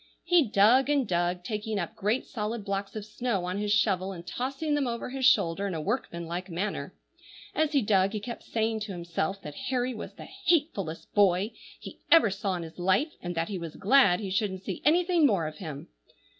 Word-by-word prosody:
He 345 -7 +4
dug 230 +8 +5
and 280 -5 +2
dug, 175 0 0
taking 215 +1 -3
up 175 -3 -3
great 215 +6 0
solid 215 -1 -4
blocks 195 0 -3
of 215 -1 -5
snow 215 -4 -2
on 180 +2 -2
his 210 0 -1
shovel, 195 -3 +2
and 170 -2 -9
tossing 275 - -2
them 290 -3 +1
over 235 +1 -4
his 265 -1 -1
shoulder 200 -5 +3
in 185 - -3
a - - -2
workman 170 - -3
like 175 +3 -5
manner. 180 +5 -3 0.6
As 315 -1 +1
he 275 -4 +3
dug, 195 -1 +3
he 215 - -2
kept 235 +4 -7
saying 225 0 -1
to 210 -2 -5
himself 170 +2 -3
that 150 - -7 0.2
Harry 255 -1 0
was 215 - -8
the - - -10 0.2
hatefullest 275 - 0
boy 200 +1 +3 0.3
he - - -10
ever 325 -11 +6
saw 195 -1 -2
in 175 - -4
his 165 +2 -10
life, 190 - +2
and 175 0 -4
that 165 0 -1
he 195 -3 -3
was 165 -2 -7
glad 200 -4 +4
he 200 -3 -4
shouldn't 190 -1 -1
see 190 - -5
anything 340 0 +4
more 195 - +1
of 155 0 -6
him. 150 -6 -7
205 Hz, 210 wpm, -28 LUFS, 180-245 Hz, 0.6 s, ever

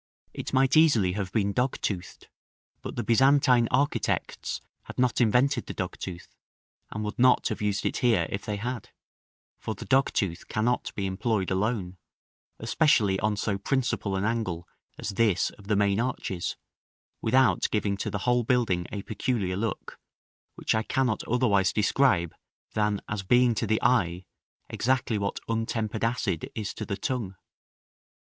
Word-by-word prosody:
It - - -5
might 130 +2 +3
easily 145 - +5
have 95 -1 -3
been 100 -2 0
dogtoothed, 115 -7 -2 0.6
but - - -6
the 120 - -2
Byzantine 125 +1 +4
architects 140 +3 -1 0.3
had - - -10
not 125 0 +2
invented 125 +3 +2
the - - -6
dogtooth, 90 -1 -5 0.6
and 105 - -4
would 105 +2 -5
not 125 0 +4
have - - -4
used 105 -1 -1
it - - 0
here, 115 -10 +3
if 100 - -3
they 105 - -3
had; 120 +2 -5 0.7
for 110 - -4
the - - -8
dogtooth 115 -9 +1
cannot 120 +3 0
be 100 - -2
employed 95 +1 -1
alone, 95 -2 -1 0.6
especially 110 -6 +2
on 105 -1 0
so 100 -1 -1
principal 120 -4 -1
an 95 - -1
angle 105 -7 -2 0.3
as - - -4
this 100 -3 +2
of 100 - -16
the 105 - +2
main 100 0 +2
arches, 115 -7 -2 0.6
without 130 +4 +3
giving 105 -2 0
to - - -3
the 100 -2 -4
whole 120 -1 +3
building 110 -8 +1
a 100 -2 -4
peculiar 105 -5 -1
look, 110 +1 -4 0.6
which - - 0
I 110 - +2
can 130 +4 0
not 110 -4 0
otherwise 110 -6 +2
describe 105 - +2 0.4
than 105 -2 0
as 105 -2 -3
being 120 +5 +4
to 115 0 -2
the 110 +1 +2
eye, 95 -7 +2 0.4
exactly 125 -3 0
what 100 0 -2
untempered 115 -1 -2
acid 115 -7 -1
is 105 -3 -3
to - - -6
the 100 - -3
tongue. 115 -9 -3
110 Hz, 155 wpm, -27 LUFS, 100-125 Hz, 0.7 s, easily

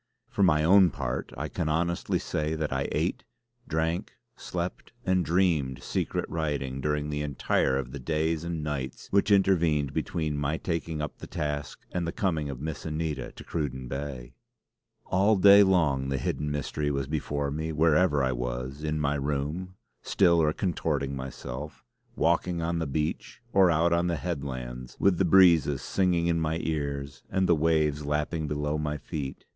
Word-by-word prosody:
For - - -1
my 75 -5 +4
own 95 +2 +6
part - - -4
I 75 +3 -3
can 80 0 -2
honestly 85 +2 0
say 75 +1 -2
that 75 -3 -2
I 65 +1 -1
ate, - - -1 0.4
drank, 80 +5 -1 0.2
slept 90 +4 -5
and 95 -1 +2
dreamed 80 -8 +1
secret - - -2
writing 70 -5 -2
during 75 +1 -1
the 75 0 -2
entire 70 -2 +1
of 65 -2 -4
the 70 - -6
days 80 +3 -1
and 85 -2 -3
nights 70 -4 -4
which 100 +1 +3
intervened 85 -8 +3
between 75 -3 -2
my 75 +2 0
taking 80 -3 -3
up 75 - -6
the - - -8
task 75 -2 -4
and 85 -2 -2
the - - -1
coming 80 -7 -1
of 65 -3 -6
Miss 75 +1 -5
Anita 80 -1 -3
to - - -11
Cruden 65 -5 -3
Bay. 65 -2 -5 0.7
All 100 +4 +3
day 100 +1 +8
long 75 -9 +3
the 70 - 0
hidden 75 +3 -2
mystery 75 +1 -2
was 70 -1 -1
before 70 -1 -2
me; 80 +2 -3
wherever 75 -1 +3
I 65 - +2
was, 60 +3 -4
in 75 0 -1
my 70 -1 +1
room, 75 +6 -3 0.3
still 85 -4 +3
or 75 -1 +3
contorting 75 -6 -1
myself; 65 +2 -7 0.3
walking 85 +1 +1
on 85 0 -1
the 80 - -2
beach; 75 +9 -3
or 95 -2 +6
out 85 +1 +3
on 85 +1 +2
the 85 - 0
headlands, 65 -7 -5
with 95 -3 +3
the 95 - +4
breezes 85 -6 +5
singing 90 -3 +1
in 85 -1 +2
my 80 0 0
ears, 70 -3 -3
and 95 -1 +1
the 85 - +5
waves 75 -2 +2
lapping 75 +2 -1
below 75 +1 -1
my 75 -1 -2
feet. 75 -3 -6
75 Hz, 170 wpm, -28 LUFS, 70-85 Hz, 0.7 s, day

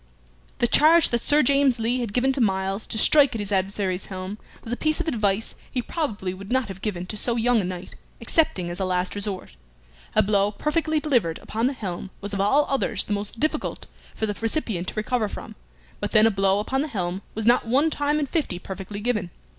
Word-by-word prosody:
The - - +2
charge 315 +7 +5
that 235 -1 0
Sir 295 +1 +4
James 275 -1 +3
Lee 235 +3 0
had 235 -4 -3
given 255 +4 +2
to 265 - 0
Myles 195 -1 0
to - - -2
strike 280 +2 +6
at - - -2
his 205 -1 -4
adversary's 190 -1 0
helm 190 +2 -6 0.2
was 230 - -4
a - - +1
piece 310 +5 0
of 345 - -2
advice 215 -6 0 0.2
he 255 - -2
probably 215 - -3
would 195 +3 -9
not 260 -4 +1
have 190 0 -8
given 180 -5 -3
to 200 - -5
so 235 +3 +2
young 235 -1 +3
a - - -4
knight, 180 0 -6 0.3
excepting 230 - +1
as 175 - -5
a 190 - 0
last 180 0 0
resort. 200 - -5 0.6
A - - +5
blow 200 0 +2
perfectly 310 +6 0
delivered 240 - +1
upon 225 +3 -1
the 275 - -1
helm 190 -6 -5
was 205 +1 -6
of 195 - 0
all 275 +9 +4
others 275 - 0
the 210 - -3
most 205 +2 -4
difficult 310 +2 -2 0.3
for 220 - -1
the 205 - -2
recipient 225 - -1
to - - -5
recover 220 0 0
from, - - -8 0.4
but - - -4
then 215 +1 +6
a 225 - +5
blow 195 -1 +2
upon 260 +6 0
the 305 - -1
helm 185 -7 -3
was 220 0 -2
not 240 0 +4
one 280 +7 +3
time 295 +1 +1
in 295 - 0
fifty 280 - -2
perfectly 195 +2 -7
given. 215 -5 -1
220 Hz, 220 wpm, -24 LUFS, 195-265 Hz, 0.6 s, strike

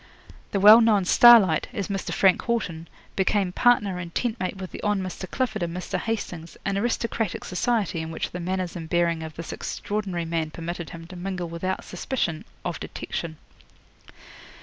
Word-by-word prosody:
The 200 - -1
well 210 +4 +9
known 210 -4 +4
Starlight, 205 -7 +7
as 200 -6 -3
Mr. 195 -1 -3
Frank 190 -2 +4
Haughton, 180 -9 -2 0.3
became 195 -1 +1
partner 205 -4 +3
and 170 -1 -8
tent 240 -2 -1
mate 185 +1 -3
with 190 -1 -7
the - - -8
Hon. 210 0 +1
Mr. 185 0 -6
Clifford 245 -6 -2
and 170 0 -2
Mr. 180 +1 -3
Hastings, 180 -7 -4
an 195 - 0
aristocratic 225 -1 -1
society 195 -3 0
in 160 - -5
which 160 - -4
the 180 - -5
manners 185 0 -2
and 165 -2 -6
bearing 170 -1 +1
of 160 -1 -7
this 165 - -6
extraordinary 195 -5 -3
man 165 -1 -1
permitted 170 +1 -6
him 165 0 -9
to 185 +2 -11
mingle 180 -1 -4
without 185 +3 -3
suspicion 175 -4 -3 0.2
of - - -3
detection. 160 -2 -5
185 Hz, 170 wpm, -25 LUFS, 170-210 Hz, 0.3 s, well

